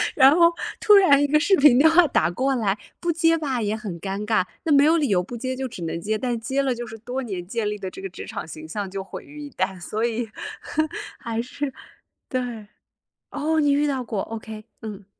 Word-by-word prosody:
然 275 +1 +7
后 340 0 +6 0.3
突 420 - +7
然 295 -8 +6
一 - - +2
个 305 +2 +4
视 385 +5 +4
频 280 -5 +6
电 310 +4 +7
话 335 +2 +6
打 - - +2
过 260 +9 0
来， 210 -4 0 0.2
不 345 - 0
接 330 0 +3
吧 270 -6 -2
也 210 0 0
很 200 -7 -6
尴 200 +1 -3
尬， 215 -4 +2 0.2
那 315 - +1
没 280 0 +6
有 320 +3 +5
理 300 -3 +1
由 185 -5 +2
不 240 +6 -7
接 260 +2 -3
就 265 0 -3
只 190 -8 -8
能 165 +1 -3
接， 215 +3 -1
但 245 0 -1
接 265 +5 -1
了 260 -2 0
就 240 0 -5
是 225 - -9
多 245 +4 -4
年 190 -7 -5
建 215 +1 -1
立 210 - -3
的 195 -2 -5
这 190 - -10
个 195 - -5
职 - - -9
场 - - -5
形 155 -1 -9
象 195 +4 -4
就 195 0 -4
毁 - - -9
于 300 +1 -12
一 290 - -7
旦， 185 -3 -2
所 215 +5 -3
以， 235 -1 -1 0.9
还 230 -2 -3
是 270 +3 -5 0.6
对。 245 -5 -3 0.6
哦， 315 +2 0
你 290 -1 +3
遇 290 +1 +2
到 270 -3 -1
过 220 -4 -3
，OK， 220 -1 -8 0.2
嗯。 205 -3 -8
240 Hz, 255 characters per minute, -24 LUFS, 210-285 Hz, 0.9 s, 然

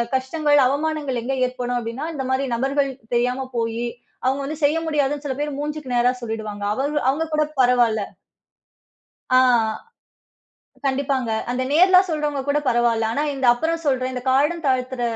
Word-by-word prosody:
கஷ்டங்கள், 290 +2 +2
அவமானங்கள் 290 -2 -1
எங்க 265 +3 -2
ஏற்படும் 245 -1 -3
அப்டின்னா 235 +6 -5
இந்த 275 -3 -3
மாரி 265 +1 +1
நபர்கள் 275 +3 0 0.2
தெரியாம 250 +2 0
போயி 230 +1 -1 0.4
அவங்க 265 +2 +1
வந்து 300 +1 -5
செய்ய 305 +3 +2
முடியாதுன்னு 290 -1 0
சில 265 -2 -2
பேர் 295 -2 -3
மூஞ்சுக்கு 295 -3 -4
நேரா 245 +1 +3
சொல்லிடுவாங்க. 220 -3 -5
அவங் 285 +5 -2
அவங்க 310 +4 0
கூடப் 305 -1 -1
பரவால்ல. 240 -4 +3 1.3
ஆ - - +7 1.5
கண்டிப்பாங்க. 265 -3 0 0.2
அந்த 255 +1 -1
நேர்லா 365 +4 +6
சொல்றவங்க 300 -3 -1
கூடப் 295 0 0
பரவால்ல. 235 -2 +2
ஆனா 285 - -1
இந்த 265 -1 -1
அப்புறம் 325 +7 -1
சொல்றேன், 260 -2 0
இந்தக் 250 +1 -6
காலம் 295 +6 +2
தாழ்த்துற 255 -1 0
265 Hz, 145 wpm, -22 LUFS, 245-295 Hz, 1.5 s, ஆ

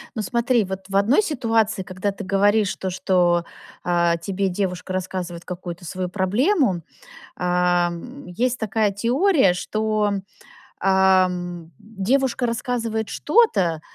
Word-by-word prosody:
Ну, 220 - -2
смотри, 235 +2 +1
вот 190 0 -5
в 195 - +1
одной 220 - +4
ситуации, 225 - 0
когда 185 +2 -3
ты 200 - -8
говоришь 200 +1 +2
то, 190 - -4
что, 175 -2 +1 0.4
а, 170 -1 +2
тебе 190 +3 -2
девушка 180 -1 -3
рассказывает 180 -2 -4
какую-то 175 -1 -7
свою 185 +2 -4
проблему, 205 - +1 0.5
а, 180 -1 +2
м, 250 +11 -9
есть 240 +8 -1
такая 220 -2 0
теория, 245 - +3
что, 215 +3 -1
м, 195 -1 -3 0.6
а, 190 0 +4
м, 175 -2 -6
девушка 240 +5 0
рассказывает 230 -2 -2
что-то, 200 - +2
195 Hz, 130 wpm, -22 LUFS, 180-225 Hz, 0.6 s, одной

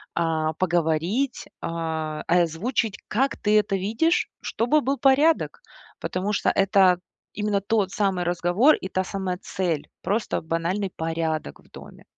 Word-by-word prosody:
а, 160 -2 0
поговорить, 175 - 0 0.2
а, 160 -2 -3
э, 175 +1 +4
озвучить, 195 +6 -1
как 270 +5 0
ты 210 0 +3
это 200 -2 +1
видишь, 225 - +1
чтобы 245 +7 +1
был 275 +2 0
порядок. 290 - +3 0.4
Потому 190 +3 -2
что - - +1
это 190 -2 +4 0.3
именно 210 -1 0
тот 200 -1 0
самый 195 -4 0
разговор 175 - +3
и 190 - -6
та 185 0 -1
самая 190 -1 -3
цель- 170 -6 -2
просто 215 +3 -1
банальный 170 +5 -1
порядок 160 - -3
в - - -22
доме. - - -13
190 Hz, 140 wpm, -24 LUFS, 165-215 Hz, 0.4 s, э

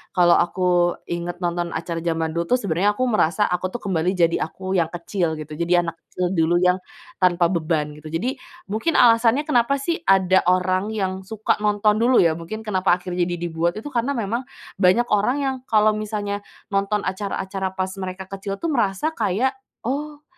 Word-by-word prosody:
kalau 175 -2 +5
aku 175 0 +2
ingat 175 +1 -5
nonton 175 0 -2
acara 165 +1 -3
zaman 165 -1 -1
dulu, 170 +1 -2
tuh, - - -1
sebenarnya 200 +3 +1
aku 255 - -1
merasa, 210 -1 +2
aku, 180 -1 0
tuh, 240 - -4
kembali 185 -1 0
jadi 170 -2 +2
aku 190 +4 -4
yang 165 - +2
kecil 170 -1 -2
gitu, 155 0 -8
jadi 175 +1 +3
anak 165 -1 -6
kecil 180 0 -2
dulu 170 -1 +2
yang 180 +1 +3 0.4
tanpa 175 -1 +3
beban 155 -3 0
gitu. 150 +1 -11
Jadi, 235 - -2 0.3
mungkin 225 +11 0
alasannya 235 +3 +5
kenapa, 275 -3 +2
sih, 280 +5 -2
ada 190 -1 +5
orang 185 +4 +1
yang 190 -1 -3
suka 220 -1 -1
nonton 210 0 +2
dulu, 240 -3 +5
ya, 165 -1 +1
mungkin 215 +7 -6
kenapa 185 -4 +2
akhirnya 180 -1 -2
jadi 175 - -2 0.2
dibuat 170 +2 0
itu 250 +7 -7
karena 250 +3 0
memang 235 +2 -2 0.3
banyak 200 +6 +4
orang 210 +7 +2
yang 270 -1 0
kalau 215 0 +4
misalnya 210 -1 -3 0.3
nonton 200 +1 0
acara-acara 190 0 -3
pas 185 -1 -2
mereka 185 0 -6
kecil, 195 0 -4
tuh, 330 +10 -3
merasa 230 +2 0
kayak, 250 - 0 0.3
"Oh, 295 +4 -4
190 Hz, 180 wpm, -22 LUFS, 175-215 Hz, 0.4 s, kalau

